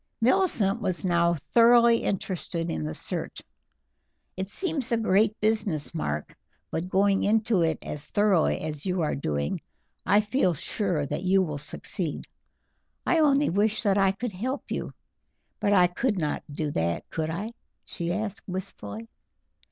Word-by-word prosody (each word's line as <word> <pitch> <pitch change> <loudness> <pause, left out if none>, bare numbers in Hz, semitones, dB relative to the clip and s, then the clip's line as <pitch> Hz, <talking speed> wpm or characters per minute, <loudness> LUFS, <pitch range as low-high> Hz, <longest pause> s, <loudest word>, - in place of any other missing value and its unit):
Millicent 235 - +2
was 185 -2 -2
now 170 -1 +3 0.2
thoroughly 235 0 +6
interested 175 -3 -2
in 80 - -3
the 75 - -3
search. - - -4 1.0
"It 190 +1 -3
seems 295 - -2
a 235 - +3
great 215 0 +2
business, 210 -9 0
Mark, 75 - -3 0.4
but 175 +3 -3
going 195 +1 +3
into 215 -2 +2
it 160 -2 +1
as 150 0 -4
thoroughly 205 -6 +2
as 150 -2 -4
you 185 -1 -1
are 150 - 0
doing 75 - -2 0.4
I 205 +1 +4
feel 210 -5 +1
sure 175 -1 -1
that 150 +4 -3
you 190 +1 +3
will 150 -4 -4
succeed. 155 +2 -2 0.8
I 335 - +3
only 290 -2 +4
wish 215 +3 +1
that 200 -2 +3
I 195 -1 +4
could 230 +2 -4
help 255 +9 -4
you; - - -3 0.7
but 205 - +1
I 185 -3 +6
could 205 +5 0
not 150 -4 -1
do 150 0 -2
that, 85 -6 -1
could 160 -1 -2
I?" 200 +8 -4 0.3
she 170 0 -2
asked 210 +2 -4
wistfully. 115 - -6
190 Hz, 150 wpm, -27 LUFS, 160-215 Hz, 1.0 s, thoroughly